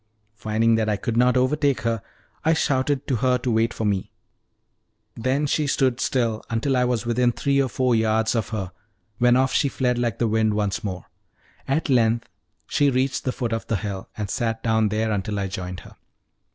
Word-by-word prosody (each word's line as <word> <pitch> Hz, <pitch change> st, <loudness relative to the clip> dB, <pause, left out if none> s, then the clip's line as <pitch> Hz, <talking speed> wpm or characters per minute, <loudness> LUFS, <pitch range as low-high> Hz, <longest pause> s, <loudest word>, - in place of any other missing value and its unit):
Finding 110 Hz, +1 st, +1 dB
that 110 Hz, -1 st, 0 dB
I 105 Hz, -, +2 dB
could 115 Hz, +1 st, -3 dB
not 125 Hz, +1 st, +4 dB
overtake 140 Hz, +2 st, +1 dB
her, 115 Hz, -2 st, -1 dB, 0.4 s
I 160 Hz, -, +4 dB
shouted 140 Hz, -1 st, 0 dB
to 130 Hz, -, 0 dB
her 125 Hz, +2 st, +2 dB
to 125 Hz, 0 st, -2 dB
wait 115 Hz, +1 st, +2 dB
for 110 Hz, -, -4 dB
me; 100 Hz, -2 st, -1 dB, 1.0 s
then 130 Hz, +5 st, 0 dB
she 150 Hz, +1 st, 0 dB
stood 130 Hz, -3 st, +1 dB
still 115 Hz, -4 st, 0 dB
until 115 Hz, +4 st, 0 dB
I 125 Hz, 0 st, +3 dB
was 120 Hz, -2 st, -1 dB
within 120 Hz, +1 st, +2 dB
three 140 Hz, +3 st, +1 dB
or 130 Hz, -, 0 dB
four 125 Hz, +1 st, +1 dB
yards 110 Hz, 0 st, +2 dB
Of 115 Hz, -3 st, -1 dB
her, 100 Hz, -5 st, -4 dB, 0.5 s
when 120 Hz, 0 st, +5 dB
off 130 Hz, 0 st, +2 dB
she 140 Hz, -, +2 dB
fled 125 Hz, -2 st, 0 dB
like 120 Hz, -4 st, -1 dB
the 120 Hz, -, +1 dB
wind 110 Hz, -1 st, +1 dB
once 105 Hz, 0 st, -1 dB
more. 95 Hz, -4 st, -5 dB, 0.6 s
At 140 Hz, +4 st, 0 dB
length 115 Hz, -4 st, +2 dB, 0.4 s
she 145 Hz, -1 st, +2 dB
reached 130 Hz, +1 st, 0 dB
the 130 Hz, -, +1 dB
foot 120 Hz, -3 st, -3 dB
of 115 Hz, -, -3 dB
the 115 Hz, -, 0 dB
hill, 100 Hz, -2 st, -5 dB
and 105 Hz, -2 st, -3 dB
sat 115 Hz, +2 st, -2 dB
down 110 Hz, -2 st, +2 dB
there 110 Hz, +1 st, 0 dB
until 105 Hz, 0 st, -2 dB
I 100 Hz, -, -1 dB
joined 90 Hz, -1 st, -5 dB
her. -, -, -15 dB
115 Hz, 200 wpm, -23 LUFS, 110-130 Hz, 1.0 s, when